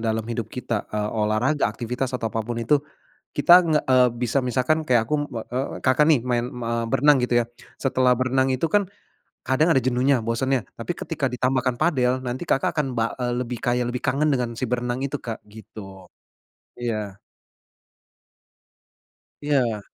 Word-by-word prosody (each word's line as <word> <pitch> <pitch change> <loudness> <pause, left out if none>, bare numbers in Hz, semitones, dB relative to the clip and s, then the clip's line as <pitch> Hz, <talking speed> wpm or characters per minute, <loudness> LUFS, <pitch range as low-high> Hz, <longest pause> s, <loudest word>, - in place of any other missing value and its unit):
dalam 110 -1 -1
hidup 115 -2 -4
kita, 120 -4 -4
eee, 105 0 -2
olahraga, 110 +7 +1
aktivitas, 125 +4 -4
atau 115 -2 -2
apa 115 - -1
pun 115 +2 -4
itu. 120 +6 +3 0.6
Kita 145 +4 +6
nge 160 -3 +2
e 130 - +4 0.2
bisa, 120 +2 -1
misalkan 130 +6 +1
kayak 120 -3 +3
aku, 150 - +1 0.2
be 115 - -4
eee, 130 +2 -1 0.2
Kakak 130 +3 +4
nih 145 -6 +5
main, 120 -1 +1
me 120 -3 -5 0.2
berenang 145 +2 +5
gitu 120 -1 +2
ya. - - -11 0.3
Setelah 130 -2 +2
berenang 130 +1 +1
itu 130 +5 0
kan 205 -1 +4 0.6
kadang 130 +5 +2
ada 135 - +3
jenuhnya, 130 -1 +2
bosennya. 125 +2 0
Tapi 115 +9 -4
ketika 150 -5 -2
ditambahkan 130 0 0
padel, 130 -5 +2
nanti 125 +7 -4
Kakak 135 - +1
akan 150 -3 +1
bal 115 0 +1
eee, 120 0 -1
lebih 125 -1 -5
kayak 125 0 0
lebih 125 0 -4
kangen 140 +4 +1
dengan 125 -3 0
si 130 - -2
berenang 125 +1 -2
itu, 140 +1 -2
Kak, 115 -2 -6
gitu. 100 -3 -12 0.7
Iya. 105 -5 -4 2.2
Iya. 130 -7 +1
125 Hz, 165 wpm, -23 LUFS, 115-135 Hz, 2.2 s, Kita